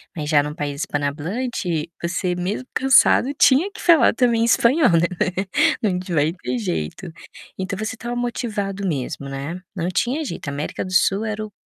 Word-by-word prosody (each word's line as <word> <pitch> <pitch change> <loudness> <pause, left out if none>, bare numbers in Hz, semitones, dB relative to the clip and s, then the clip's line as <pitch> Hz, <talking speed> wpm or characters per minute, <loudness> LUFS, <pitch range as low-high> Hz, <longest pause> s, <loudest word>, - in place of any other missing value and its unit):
Mas 150 -2 -4
já 145 -2 +4
num 150 +1 -5
país 145 0 -4
espano-hablante 170 - -2
você 180 +1 -1
mesmo 195 +8 -3
cansado 270 0 +4
tinha 290 +7 +4
que 440 - -11
falar 340 -3 +5
também 230 -2 +2
espanhol, 245 +4 +4
né, 170 0 +3 0.7
não 195 -5 +1 0.2
vai 150 +2 +2
ter 125 -9 -4
jeito. 95 - -4 0.5
Então 190 +1 -4
você 215 +1 -3
estava 240 +1 -5
motivado 210 -5 -3
mesmo, 140 -4 -3
né, 140 +5 -5 0.2
não 175 -2 -2
tinha 260 - -1
jeito, 150 - -5
América 140 +1 -4
do 185 - -7
Sul 195 +3 +3
era 215 0 -3
o 210 - -13
190 Hz, 165 wpm, -21 LUFS, 150-235 Hz, 0.7 s, falar